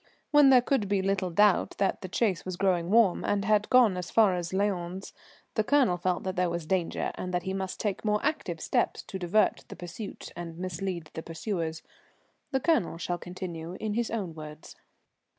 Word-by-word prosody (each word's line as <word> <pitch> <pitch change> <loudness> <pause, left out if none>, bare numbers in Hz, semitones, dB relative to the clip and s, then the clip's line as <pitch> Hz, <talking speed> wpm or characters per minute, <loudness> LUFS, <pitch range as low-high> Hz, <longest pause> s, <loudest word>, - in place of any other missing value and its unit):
When 295 -2 +7
there 255 -2 +6
could 245 -6 +1
be 200 -2 +1
little 195 -1 0
doubt 205 +3 +3
that 195 - 0
the 185 - -5
chase 190 -1 0
was 185 -1 -5
growing 180 -3 +1
warm 215 -3 +4
and 200 -1 0
had 210 -1 +2
gone 245 -6 +5
as 180 - -5
far 215 -4 +4
as 175 -1 -3
Lyons, 190 -1 -2 0.4
the 215 - +1
Colonel 260 -7 +3
felt 180 0 -1
that 185 0 -3
there 180 -1 +1
was 170 -1 -3
danger 175 0 -1
and 180 - -5
that 180 - -1
he 190 - -3
must 190 -1 -4
take 205 -3 -2
more 210 -1 +2
active 275 - -1
steps - - 0
to 190 - -7
divert 185 +4 +2
the - - -9
pursuit 180 +4 -8
and 170 -1 -7
mislead 180 -2 -4
the 160 - -5
pursuers. 165 -1 -4 0.7
The 265 - 0
Colonel 265 - +1
shall 175 +1 -3
continue 175 -2 -6
in 215 -1 -2
his 235 +1 -1
own 200 -7 -3
words. 155 -1 -10
190 Hz, 195 wpm, -28 LUFS, 175-210 Hz, 0.7 s, When